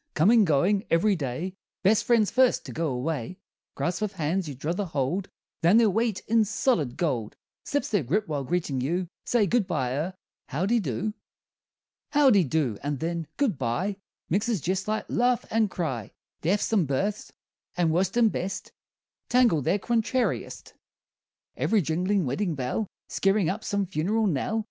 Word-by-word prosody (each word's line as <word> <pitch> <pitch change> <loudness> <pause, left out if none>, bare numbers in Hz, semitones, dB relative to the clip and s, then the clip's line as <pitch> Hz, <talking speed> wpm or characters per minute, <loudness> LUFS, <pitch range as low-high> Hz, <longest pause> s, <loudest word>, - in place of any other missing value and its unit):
Comin' 210 +7 +5
goin' 185 +6 +2
every 195 +5 +3
day 155 +5 -3 0.3
Best 205 +3 +4
friends 230 -4 +3
first 255 0 +3
to - - -7
go 165 0 -1
away 140 +4 -3 0.4
Grasp 175 +4 -2
of 210 -2 -1
hands 170 0 -1
you 140 - -6
druther 165 +9 -2
hold 160 +4 -2 0.3
Than 175 +6 +5
their 225 -3 +5
weight 225 -1 0
in 225 0 +3
solid 205 - 0
gold, 125 -11 -1 0.3
Slips 285 - -1
their 205 -5 +2
grip 180 - 0
while 145 -3 -2
greetin' 150 -4 -1
you. 175 +7 -1 0.2
Say 235 -4 +3
good 230 -1 +1
bye 135 -9 -1
er 165 +7 -2 0.3
howdy 195 - +1
do? 195 - -2 1.0
Howdy 260 - +5
do, 130 -7 0
and 145 -1 -2
then, 165 -1 -3
good 235 - +1
bye 135 - -1 0.3
Mixes 210 +4 0
jest 190 +5 -2
like 215 0 -1
laugh 245 0 +1
and 220 -1 +2
cry; 135 - -3 0.3
Deaths 200 +6 +1
and 190 -8 +3
births, 195 +10 -2 0.5
and 170 -2 +2
worst 185 +5 +1
and 230 -3 +5
best 190 +2 -4 0.6
Tangled 235 - +3
their 200 - +3
contrariest; 235 +4 -1 0.8
Ev'ry 215 -4 +2
jinglin' 180 +4 0
weddin' 170 +6 -1
bell 135 - -2 0.2
Skeerin' 195 -2 +1
up 215 +3 -6
some 200 -1 0
funeral 190 +6 0
knell. 195 +5 0
185 Hz, 160 wpm, -26 LUFS, 155-215 Hz, 1.0 s, Comin